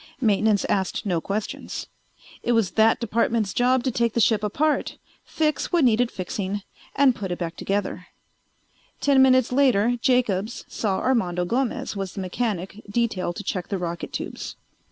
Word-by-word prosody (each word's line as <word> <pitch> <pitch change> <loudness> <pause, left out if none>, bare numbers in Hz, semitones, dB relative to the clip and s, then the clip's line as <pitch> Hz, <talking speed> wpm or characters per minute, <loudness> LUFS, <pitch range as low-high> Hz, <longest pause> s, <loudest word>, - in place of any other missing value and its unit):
Maintenance 215 -3 +2
asked 190 +2 -1
no 175 -5 0
questions. 205 +4 -4 0.6
It 240 - +1
was 225 -5 +2
that 220 +1 +4
department's 230 -2 0
job 250 0 +2
to 260 - 0
take 235 -1 0
the - - 0
ship 215 -1 +3
apart, 290 +9 0 0.3
fix 305 -1 -1
what 345 -3 +3
needed 240 0 +3
fixing, 195 +1 -4 0.3
and 275 -2 +5
put 195 -5 -5
it. 175 - -3 1.6
Ten 275 -2 +4
minutes 255 -2 +5
later 245 -3 +3
Jacobs 240 -4 +1
saw 200 -4 -1
Armando 180 -9 +1
Gomez 240 +2 -1
was 195 -2 -4
the 195 - -3
mechanic 195 0 -3
detailed 205 -6 -1
to 205 - -6
check 180 -4 -3
the 200 - -2
rocket 170 -1 -4
tubes. - - -5
220 Hz, 150 wpm, -24 LUFS, 195-245 Hz, 1.6 s, and